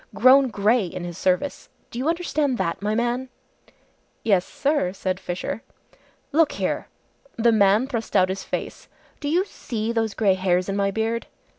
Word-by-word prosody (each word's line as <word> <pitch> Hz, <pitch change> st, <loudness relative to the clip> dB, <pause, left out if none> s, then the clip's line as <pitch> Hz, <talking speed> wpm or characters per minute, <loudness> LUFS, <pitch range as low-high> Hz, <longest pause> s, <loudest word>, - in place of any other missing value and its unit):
Grown 265 Hz, +1 st, +6 dB
grey 215 Hz, -1 st, +2 dB
in 175 Hz, +1 st, -6 dB
his 175 Hz, -1 st, -6 dB
service! 190 Hz, -, -1 dB, 0.2 s
Do 235 Hz, -, -5 dB
you 275 Hz, +5 st, 0 dB
understand 305 Hz, -6 st, 0 dB
that, 170 Hz, -2 st, -2 dB
my 210 Hz, +1 st, 0 dB
man!" 240 Hz, +2 st, -1 dB, 0.9 s
"Yes, 195 Hz, -5 st, +3 dB
sir," 280 Hz, -10 st, 0 dB
said 185 Hz, -1 st, -2 dB
Fisher. 180 Hz, +5 st, -4 dB, 0.7 s
"Look 315 Hz, +1 st, +3 dB
here!" -, -, -2 dB, 0.5 s
The 235 Hz, 0 st, +3 dB
man 210 Hz, +2 st, +4 dB
thrust 230 Hz, -6 st, -4 dB
out 185 Hz, -1 st, +5 dB
his 190 Hz, +1 st, -3 dB
face. -, -, -5 dB, 0.3 s
"Do 290 Hz, -, -3 dB
you 355 Hz, +5 st, +2 dB
see 225 Hz, -, -4 dB
those 225 Hz, -2 st, -1 dB
grey 200 Hz, -3 st, +3 dB
hairs 185 Hz, -1 st, +1 dB
in 195 Hz, -, -2 dB
my 200 Hz, 0 st, +1 dB
beard?" 225 Hz, +3 st, -2 dB
220 Hz, 165 wpm, -24 LUFS, 190-255 Hz, 0.9 s, Grown